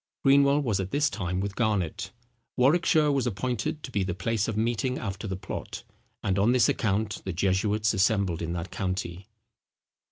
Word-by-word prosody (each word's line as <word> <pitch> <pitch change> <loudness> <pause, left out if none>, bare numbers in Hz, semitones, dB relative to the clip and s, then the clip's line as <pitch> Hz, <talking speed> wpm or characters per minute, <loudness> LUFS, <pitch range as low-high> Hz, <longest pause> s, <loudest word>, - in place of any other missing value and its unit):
Greenwell 140 +1 +5
was 110 -7 0
at 95 -1 -2
this 145 +4 +1
time 90 -2 -2
with 100 +1 -3
Garnet. 105 -8 -1 0.5
Warwickshire 155 +3 +4
was 135 -3 +1
appointed 120 +6 -2
to 130 - -7
be 100 - 0
the 90 -2 -3
place 110 +3 -1
of 110 -2 -3
meeting 120 +3 0
after 100 0 -5
the 95 - -3
plot; 95 +1 -6 0.4
and 95 0 +1
on 110 +5 +4
this 125 -3 +4
account 105 0 0
the 95 - -3
jesuits 100 +4 +1
assembled 100 -4 +1
in 85 0 -3
that 85 +1 -5
county. 95 0 -4
105 Hz, 170 wpm, -27 LUFS, 95-125 Hz, 0.5 s, Greenwell